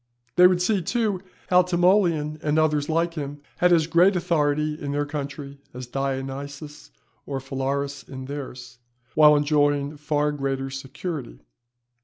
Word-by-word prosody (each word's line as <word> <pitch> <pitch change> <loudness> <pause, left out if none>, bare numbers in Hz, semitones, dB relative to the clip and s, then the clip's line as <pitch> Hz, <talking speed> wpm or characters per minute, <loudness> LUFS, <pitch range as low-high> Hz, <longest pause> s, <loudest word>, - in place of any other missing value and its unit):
They 180 0 +8
would 180 -1 +1
see, 200 0 +1
too, 210 0 -1 0.3
how 180 0 +7
Timoleon 175 -4 +2
and 150 -1 0
others 150 -2 +2
like 165 +1 +1
him, 145 -2 -5 0.2
had 180 0 +3
as 165 -2 +4
great 175 +4 +4
authority 150 -4 +1
in 145 -2 -5
their 145 0 0
country 140 -1 -6 0.2
as 125 0 -6
Dionysius 135 - -5 0.4
or 140 -1 -3
Phalaris 140 +1 -3
in 130 -1 -7
theirs, 130 -4 -8 0.3
while 150 -1 +7
enjoying 145 0 +1
far 150 0 0
greater 135 -2 -3
security. 135 - -6
145 Hz, 140 wpm, -24 LUFS, 140-165 Hz, 0.4 s, They